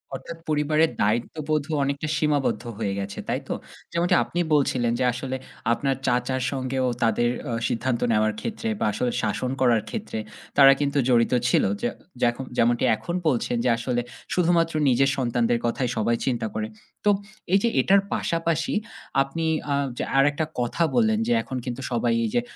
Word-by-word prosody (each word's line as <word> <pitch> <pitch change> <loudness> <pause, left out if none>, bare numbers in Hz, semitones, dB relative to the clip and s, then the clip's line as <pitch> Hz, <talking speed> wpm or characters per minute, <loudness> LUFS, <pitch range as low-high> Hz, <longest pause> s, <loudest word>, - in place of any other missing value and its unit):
অর্থাৎ 165 +5 -8
পরিবারের 155 +1 +2
দায়িত্ববোধ 145 +8 0
ও - - -1
অনেকটা 140 +2 -2
সীমাবদ্ধ 145 -4 +1
হয়ে 105 -3 -1
গেছে, 100 0 -5
তাই - - 0
তো? - - -1 0.4
যেমনটি 170 +1 +2
আপনি 175 - -4
বলছিলেন 130 -5 +2
যে - - +2
আসলে 130 +1 -4 0.4
আপনার 135 +2 0
চাচার 125 +1 +1
সঙ্গে 130 -1 -3
ও - - +2
তাদের 115 +1 +2 0.2
অ - - -2 0.2
সিদ্ধান্ত 120 +1 -1
নেওয়ার 110 0 +2
ক্ষেত্রে 230 0 -4
বা - - +1
আসলে 120 +3 0
শাসন 115 +4 -1
করার 120 -4 +4
ক্ষেত্রে 220 - -4 0.4
তারা 135 -1 +9
কিন্তু 145 0 0
জড়িত 120 0 +3 0.2
ছিল। - - +3 0.2
যে 120 - +1 0.3
যেখ 120 -1 +3 0.2
যেমনটি 120 0 +3
এখন 170 +10 -5
বলছেন 125 -4 +1
যে - - +4
আসলে 120 +1 -1 0.3
শুধুমাত্র 170 -2 +2 0.2
নিজের 135 +2 +3
সন্তানদের 120 -2 +1
কথায় 120 +1 0
সবাই 115 +2 +2
চিন্তা 120 -4 0
করে। 110 0 -1 0.4
তো - - +5 0.4
এই 195 - +6
যে 235 - +3
এটার 195 +1 +4
পাশাপাশি 165 -1 0 0.5
আপনি 135 +4 -2 0.3
আ - - +2 0.2
যে - - -1
আরেকটা 145 +3 +3
কথা 120 +7 0
বললেন 220 -2 +3
যে 240 - +3
এখন 130 - -5
কিন্তু 125 0 -4
সবাই 120 -1 +1
এই - - -1
যে 120 - +4
130 Hz, 170 wpm, -25 LUFS, 120-155 Hz, 0.5 s, তারা